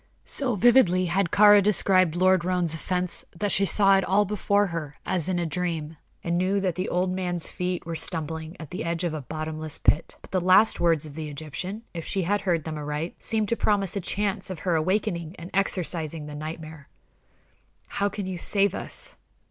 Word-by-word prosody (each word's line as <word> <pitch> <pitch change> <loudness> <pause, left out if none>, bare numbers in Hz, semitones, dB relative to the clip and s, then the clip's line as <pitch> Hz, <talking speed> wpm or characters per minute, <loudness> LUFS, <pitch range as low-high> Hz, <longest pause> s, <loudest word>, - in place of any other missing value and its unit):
So 255 -5 0
vividly 200 -5 +4
had 180 +1 +1
Kāra 205 +1 +7
described 185 -4 +3
Lord 185 0 +3
Roane's 180 -2 +1
offense, 180 +2 -1
that 205 +1 -1
she 195 0 +2
saw 195 +2 +5
it 195 - +1
all 200 +3 +2
before 205 0 +1
her 165 -6 -5
as 180 -2 -1
in 185 - 0
a 175 - 0
dream, 165 -1 -3 0.3
and 170 0 0
knew 190 +2 +1
that 190 -2 0
the 185 +3 -3
old 180 +1 0
man's 180 -2 -2
feet 180 -1 -3
were 165 0 -4
stumbling 160 0 -2
at 155 - -9
the 180 - -4
edge 170 +1 -2
of 170 -3 -1
a 155 - -4
bottomless 155 +2 -5
pit. 160 - +1
But - - -16
the 185 -1 +1
last 185 +5 +5
words 165 -3 +2
of 150 - -9
the 155 0 -5
Egyptian, 160 - -6
if 165 -2 -5
she 195 +2 -1
heard 185 -3 0
them 155 0 -5
aright, 150 +3 -4
seemed 220 -2 0
to 235 - +2
promise 200 -4 +1
a 200 - -1
chance 200 +1 -1
of 185 - -5
her 180 -3 +1
awakening 170 0 -1
and 170 +2 -9
exorcising 170 -5 -1
the 150 - -8
nightmare. 155 0 -8 1.0
"How 200 0 -1
can 200 -1 -5
you 185 -2 -4
save 200 +2 +2
us?" - - -5
180 Hz, 195 wpm, -26 LUFS, 160-195 Hz, 1.0 s, Kāra